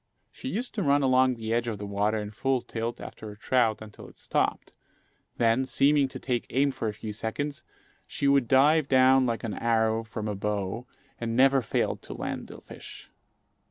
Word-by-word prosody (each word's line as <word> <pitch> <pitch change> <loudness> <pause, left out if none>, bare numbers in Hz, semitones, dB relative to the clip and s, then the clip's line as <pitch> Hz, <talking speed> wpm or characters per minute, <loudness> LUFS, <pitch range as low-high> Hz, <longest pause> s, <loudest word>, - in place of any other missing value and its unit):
She - - -9
used 245 0 -3
to 215 - -2
run 145 -3 +3
along 130 -1 +4
the 110 -1 -3
edge 120 0 0
of 110 -3 -3
the 105 - -6
water 100 +2 0
in 105 -1 -4
full 130 +3 0
tilt 115 +1 -4
after 110 - -9
a 105 - -11
trout 115 -2 +1
until 105 -1 -12
it - - -17
stopped; - - -2 0.6
then, 115 +2 +3
seeming 140 +1 +3
to 130 - -8
take 125 -2 -2
aim 140 +2 +2
for 130 -4 -4
a 105 - -2
few 105 -1 -6
seconds, 140 +7 -4 0.4
she 140 - -1
would 140 -3 +3
dive 145 +4 +4
down 130 0 +5
like 115 -2 -2
an 110 -3 -3
arrow 115 -1 +1
from 110 -1 -6
a 105 - -2
bow, 105 +3 -3 0.3
and 115 -1 -3
never 135 +1 +5
failed 115 - -1
to - - -9
land - - -5
the - - -11
fish. - - -12
120 Hz, 195 wpm, -27 LUFS, 110-135 Hz, 0.6 s, down